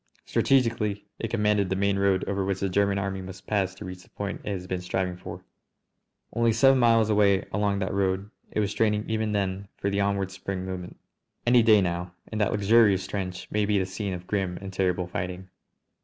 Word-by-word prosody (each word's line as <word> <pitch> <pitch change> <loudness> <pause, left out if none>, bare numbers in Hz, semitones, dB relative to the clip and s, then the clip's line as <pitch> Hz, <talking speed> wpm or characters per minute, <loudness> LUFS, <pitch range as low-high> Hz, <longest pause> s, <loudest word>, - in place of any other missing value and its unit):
Strategically 115 -6 +1
it 115 - -3
commanded 105 -3 +1
the 95 - 0
main 100 0 +1
road 100 -1 +2
over 100 -1 -1
which 95 -1 -1
the 100 - 0
German 100 +1 +2
Army 100 -1 -2
must 95 0 -10
pass 95 -3 0
to 100 - -9
reach 90 0 -8
the - - -20
point 100 0 -5
it - - -4
has 95 -3 -3
been 90 0 -3
striving 90 0 -2
for. 90 - -9 0.9
Only 115 -1 +2
seven 135 +3 +5
miles 115 -2 +4
away 100 -2 +3
along 100 0 +1
that 95 -1 -2
road 95 +1 0 0.2
it - - -2
was 105 -1 0
straining 105 -1 +1
even 110 -1 -1
then 100 -1 -1
for 100 - -1
the 100 0 +1
onward 100 -1 0
spring 95 -1 -5
movement. 90 -1 -6 0.5
Any 120 0 +6
day 110 -2 +6
now, 90 0 -2 0.2
and 110 -1 -2
that 105 - +2
luxurious 105 -2 +4
trench 95 -2 -4
may 105 0 +1
be 105 0 +2
the 95 - +1
scene 95 +1 -4
of 90 0 -9
grim 95 -3 -1
and 95 0 -8
terrible 90 -1 0
fighting. 90 +1 -5
100 Hz, 205 wpm, -26 LUFS, 95-105 Hz, 0.9 s, Any